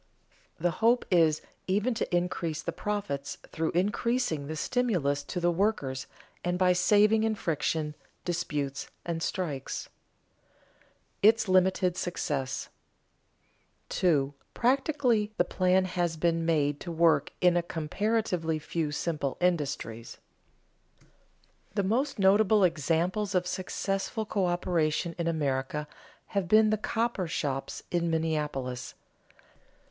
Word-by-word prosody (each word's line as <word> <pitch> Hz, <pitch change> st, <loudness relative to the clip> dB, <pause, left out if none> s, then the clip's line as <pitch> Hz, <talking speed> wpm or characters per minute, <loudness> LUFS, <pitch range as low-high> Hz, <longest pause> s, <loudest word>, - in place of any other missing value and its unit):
The 175 Hz, +2 st, +1 dB
hope 230 Hz, +7 st, +2 dB
is 160 Hz, -4 st, +4 dB, 0.2 s
even 210 Hz, +6 st, +1 dB
to 220 Hz, -5 st, -1 dB
increase 170 Hz, -3 st, -1 dB
the -, -, -2 dB
profits 200 Hz, -10 st, -3 dB
through 160 Hz, 0 st, -1 dB
increasing 205 Hz, -, 0 dB
the 155 Hz, -, -4 dB
stimulus 175 Hz, -, 0 dB
to 180 Hz, -, -3 dB
the 175 Hz, 0 st, +2 dB
workers 165 Hz, -9 st, -1 dB, 0.4 s
and 175 Hz, 0 st, 0 dB
by 180 Hz, 0 st, +4 dB
saving 210 Hz, +4 st, +4 dB
in 220 Hz, -1 st, +1 dB
friction, 160 Hz, -5 st, -1 dB, 0.3 s
disputes, 150 Hz, -5 st, -2 dB, 0.2 s
and 165 Hz, -1 st, -2 dB
strikes. 150 Hz, -7 st, -3 dB, 1.3 s
[Sidenote: -, -, -42 dB
Its 220 Hz, +1 st, +5 dB
limited 185 Hz, -1 st, +3 dB
success] 140 Hz, -8 st, -2 dB, 1.2 s
2. 145 Hz, -6 st, +2 dB, 0.2 s
Practically 250 Hz, -4 st, +2 dB
the -, -, +4 dB
plan 185 Hz, +1 st, +2 dB
has 175 Hz, -3 st, -1 dB
been 165 Hz, 0 st, +1 dB
made 145 Hz, -3 st, +1 dB
to 175 Hz, -, -6 dB
work 165 Hz, 0 st, +3 dB
in 180 Hz, -1 st, +4 dB
a 175 Hz, -, +3 dB
comparatively 170 Hz, 0 st, -1 dB
few 155 Hz, 0 st, -2 dB
simple 150 Hz, -3 st, -2 dB
industries. 145 Hz, -10 st, -1 dB, 1.6 s
The 200 Hz, -, +1 dB
most 260 Hz, +9 st, 0 dB
notable 205 Hz, +1 st, +4 dB
examples 175 Hz, +5 st, +1 dB
of 180 Hz, 0 st, +2 dB
successful 195 Hz, +4 st, -2 dB
coöperation 175 Hz, -4 st, 0 dB
in 170 Hz, -, 0 dB
America 150 Hz, -2 st, -1 dB, 0.4 s
have 200 Hz, -3 st, -1 dB
been 215 Hz, +3 st, +5 dB
the 215 Hz, -, +1 dB
cooper 225 Hz, -4 st, -1 dB
shops 140 Hz, -4 st, -3 dB
in 170 Hz, -1 st, +1 dB
Minneapolis. 150 Hz, -6 st, -2 dB
175 Hz, 115 wpm, -29 LUFS, 155-205 Hz, 1.6 s, Its